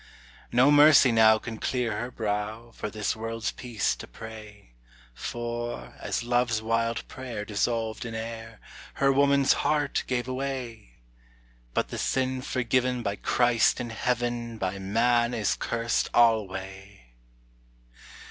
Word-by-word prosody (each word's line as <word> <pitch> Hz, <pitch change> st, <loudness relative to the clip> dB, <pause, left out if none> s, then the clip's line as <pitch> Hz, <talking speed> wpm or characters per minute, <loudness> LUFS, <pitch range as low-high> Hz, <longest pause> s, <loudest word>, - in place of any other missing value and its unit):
No 125 Hz, +4 st, +5 dB
mercy 145 Hz, -3 st, +7 dB
now 110 Hz, -1 st, +6 dB
can 110 Hz, 0 st, -7 dB
clear 125 Hz, -4 st, -1 dB
her 120 Hz, -, -4 dB
brow 110 Hz, 0 st, -3 dB
For 105 Hz, -, -5 dB
this 105 Hz, -1 st, -2 dB
world's 115 Hz, 0 st, -3 dB
peace 120 Hz, -5 st, -2 dB
to -, -, -9 dB
pray; 105 Hz, -, -11 dB, 0.4 s
For, 120 Hz, -, -5 dB
as -, -, -2 dB
love's 120 Hz, -2 st, +1 dB
wild 115 Hz, +1 st, -1 dB
prayer 120 Hz, -5 st, -6 dB
dissolved 110 Hz, +2 st, -1 dB
in 115 Hz, -2 st, -6 dB
air, 110 Hz, 0 st, -7 dB, 0.4 s
Her 135 Hz, 0 st, +3 dB
woman's 140 Hz, 0 st, +4 dB
heart 145 Hz, -2 st, 0 dB
gave 125 Hz, -1 st, -1 dB
way! 130 Hz, -, -5 dB, 0.8 s
But -, -, 0 dB
the -, -, -5 dB
sin 130 Hz, 0 st, 0 dB
forgiven 125 Hz, 0 st, 0 dB
by 100 Hz, -2 st, -1 dB
Christ 120 Hz, +2 st, +2 dB
in 120 Hz, -1 st, -4 dB
heaven 120 Hz, 0 st, -2 dB
By 95 Hz, -1 st, -3 dB
man 120 Hz, +4 st, +2 dB
is 110 Hz, -3 st, 0 dB
cursed 115 Hz, 0 st, -1 dB
alway! 95 Hz, -, +1 dB
115 Hz, 130 wpm, -27 LUFS, 110-125 Hz, 0.8 s, mercy